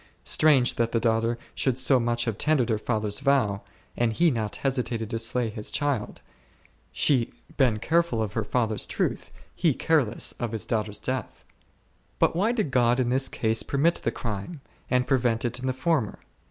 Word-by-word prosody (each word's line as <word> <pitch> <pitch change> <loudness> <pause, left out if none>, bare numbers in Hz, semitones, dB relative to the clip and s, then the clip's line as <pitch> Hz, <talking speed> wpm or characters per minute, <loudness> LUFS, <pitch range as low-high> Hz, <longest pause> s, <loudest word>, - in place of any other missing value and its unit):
Strange, 140 -5 +3
that 115 -1 0
the 115 - +2
daughter 115 0 +1 0.2
should 130 -3 0
so 130 0 +4
much 120 0 0
have 115 -3 -1
tendered 150 -6 +2
her 110 -2 +1
father's 110 -2 -1
vow, 135 -8 +1 0.3
and 120 -2 +1
he 170 +8 +3
not 110 -4 -2
hesitated 120 -4 -2
to 115 - -1
slay 115 +1 0
his 105 -1 -4
child; 145 -7 -2 0.7
she 125 -5 +1 0.2
been 125 -6 +3
careful 165 0 +1
of 105 -2 -2
her 115 - -1
father's 110 -1 -1
truth, - - -2 0.2
he 165 -7 +1
careless 145 -9 +1
of 120 -2 -3
his 110 - -2
daughter's 105 -2 -2
death! 130 -3 -4 0.7
But - - +2
why 200 +7 +2
did 215 - -1
God 120 0 +3
in 125 -2 +1
this 130 +2 +2
case 110 0 0
permit 150 +5 +2
the - - +1
crime, 115 - -5 0.3
and 125 0 +2
prevent 120 -3 +1
it 125 +1 -2
in 130 - -4
the - - +2
former 135 - -1
120 Hz, 180 wpm, -26 LUFS, 110-135 Hz, 0.7 s, so